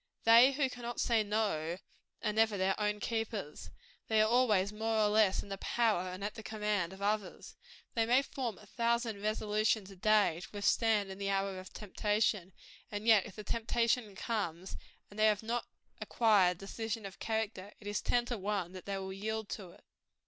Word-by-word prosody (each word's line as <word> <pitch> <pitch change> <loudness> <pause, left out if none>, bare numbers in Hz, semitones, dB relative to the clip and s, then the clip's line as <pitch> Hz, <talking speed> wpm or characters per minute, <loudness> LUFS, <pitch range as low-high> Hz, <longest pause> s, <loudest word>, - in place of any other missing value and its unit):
They 235 +4 +7
who 275 0 +1
cannot 240 -2 -6
say 230 -2 +3
no, 205 -6 -1 0.5
are 210 -2 0
never 220 -1 +2
their 190 0 +2
own 210 0 0
keepers; 210 - -4 0.4
they 220 -1 +2
are 215 - +5
always, 215 -5 +3
more 220 +1 -1
or 210 -1 +3
less, 210 -2 +3
in - - -13
the 195 0 -5
power 215 -6 +1
and 185 +2 -7
at 205 - -3
the 225 - -8
command 210 -5 -1
of 190 +1 -9
others. 205 -2 -2 0.4
They 225 -1 +1
may 255 +3 +4
form 255 -7 -4
a - - -15
thousand 235 -3 -1
resolutions 215 -1 0
a - - -11
day, 205 -3 +3
to 205 - -8
withstand 205 0 +2
in 190 - -9
the 200 0 -2
hour 195 -1 -1
of 185 - -11
temptation; 210 -2 -1 0.4
and 205 +1 -4
yet, 220 -3 +5
if 195 - -12
the 210 - -7
temptation 230 -1 0
comes, 190 -5 -3 0.4
and 205 - -10
they 215 - +6
have 210 0 +1
not 235 +2 -2 0.3
acquired 200 -6 +3
decision 220 +3 -5
of 195 0 -9
character, 220 -3 -3
it 210 - -15
is 205 0 -2
ten 240 -1 +1
to 240 -2 -3
one 195 -3 -2
but 185 - -9
they 200 -1 -2
will 190 0 -5
yield 220 +2 -4
to 190 -4 -6
it. - - -18
210 Hz, 190 wpm, -33 LUFS, 195-225 Hz, 0.5 s, They